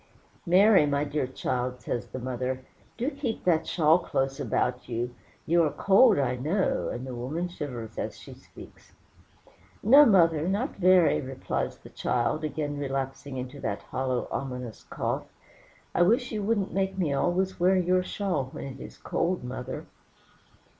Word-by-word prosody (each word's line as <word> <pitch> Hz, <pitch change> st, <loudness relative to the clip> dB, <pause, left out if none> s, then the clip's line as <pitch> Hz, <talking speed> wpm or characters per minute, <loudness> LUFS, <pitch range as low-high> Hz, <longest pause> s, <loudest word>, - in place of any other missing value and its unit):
"Mary, 190 Hz, -2 st, +6 dB
my 140 Hz, 0 st, +1 dB
dear 145 Hz, -2 st, -1 dB
child," 125 Hz, -1 st, -3 dB
says 120 Hz, -, -4 dB
the -, -, -7 dB
mother, 130 Hz, +1 st, -3 dB, 0.3 s
"do 250 Hz, +5 st, -1 dB
keep 270 Hz, -6 st, -4 dB
that 165 Hz, -3 st, +2 dB
shawl 160 Hz, 0 st, +4 dB
close 135 Hz, -3 st, -2 dB
about 125 Hz, -1 st, -1 dB
you; 120 Hz, +1 st, -2 dB, 0.3 s
you 170 Hz, +1 st, +4 dB
are 155 Hz, -, +3 dB
cold, 200 Hz, -, +5 dB
I 125 Hz, -3 st, 0 dB
know," 160 Hz, +10 st, 0 dB
and 125 Hz, +2 st, -5 dB
the 130 Hz, -, -6 dB
woman 140 Hz, +9 st, -3 dB
shivers 125 Hz, -10 st, -6 dB
as -, -, -4 dB
she -, -, -11 dB
speaks. -, -, -15 dB, 0.9 s
"No, 275 Hz, +8 st, +8 dB
mother, 165 Hz, -6 st, +4 dB
not 210 Hz, +9 st, -1 dB
very," 185 Hz, -2 st, +5 dB
replies 130 Hz, -1 st, -3 dB
the -, -, -14 dB
child, 125 Hz, +6 st, -1 dB
again 145 Hz, -1 st, -3 dB
relapsing 135 Hz, 0 st, -4 dB
into 130 Hz, +3 st, -6 dB
that -, -, -3 dB
hollow, 130 Hz, -1 st, -2 dB
ominous 125 Hz, -4 st, -5 dB
cough. -, -, -2 dB, 0.7 s
"I -, -, +2 dB
wish 235 Hz, +8 st, +3 dB
you 215 Hz, -2 st, -2 dB
wouldn't 205 Hz, -1 st, 0 dB
make 190 Hz, 0 st, -1 dB
me 165 Hz, -7 st, 0 dB
always 185 Hz, +6 st, 0 dB
wear 185 Hz, +2 st, +4 dB
your 185 Hz, 0 st, +2 dB
shawl 180 Hz, -6 st, -2 dB
when -, -, -6 dB
it 135 Hz, -1 st, -7 dB
is -, -, -10 dB
cold, 175 Hz, -3 st, -1 dB
mother." 125 Hz, 0 st, -6 dB
150 Hz, 160 wpm, -27 LUFS, 130-185 Hz, 0.9 s, No